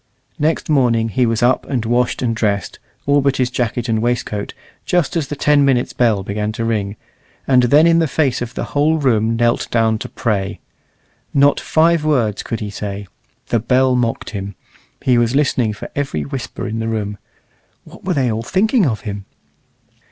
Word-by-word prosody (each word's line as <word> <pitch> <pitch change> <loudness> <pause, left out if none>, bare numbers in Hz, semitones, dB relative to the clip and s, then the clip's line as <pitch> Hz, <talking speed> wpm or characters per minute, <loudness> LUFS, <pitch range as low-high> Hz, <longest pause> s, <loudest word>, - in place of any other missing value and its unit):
Next 155 +2 0
morning 120 -6 +2
he 120 +4 +1
was 115 0 0
up 125 +1 +2
and 125 -5 -2
washed 120 +2 0
and 115 -2 0
dressed, 100 -4 -1 0.3
all 145 +1 +3
but 140 -1 +1
his 125 -1 0
jacket 120 -1 -2
and 110 -1 0
waistcoat, 115 -3 -2 0.3
just 175 -4 0
as 160 -5 0
the 145 - -4
ten 145 0 +3
minutes' 130 -3 +1
bell 110 -5 +2
began 105 +2 -2
to 115 0 -3
ring, 105 -3 -1 0.5
and 130 -2 +4
then 145 +6 +5
in 170 0 +5
the 165 - +2
face 140 -3 0
of 120 0 -5
the - - -2
whole 150 +3 +3
room 115 -6 +1
knelt 120 0 +1
down 110 -2 +1
to - - -6
pray. 100 -5 -2 0.8
Not 140 0 +4
five 165 0 +2
words 120 -9 +1
could 115 - -4
he 105 -1 -4
say 100 -1 -5 0.4
the 115 - +2
bell 130 +3 +2
mocked 120 -2 -1
him; 100 -2 -6 0.5
he 125 -2 +3
was 120 +2 +1
listening 130 -6 +2
for 105 - -8
every 135 - -2
whisper 70 - -5
in 110 +1 -3
the 115 - -2
room 105 -3 -3 0.6
what - - -15
were 185 - -1
they 130 -4 +1
all 110 +1 -2
thinking 200 - +2
of 110 -4 -2
him? 100 -2 -6
120 Hz, 190 wpm, -18 LUFS, 110-140 Hz, 0.8 s, then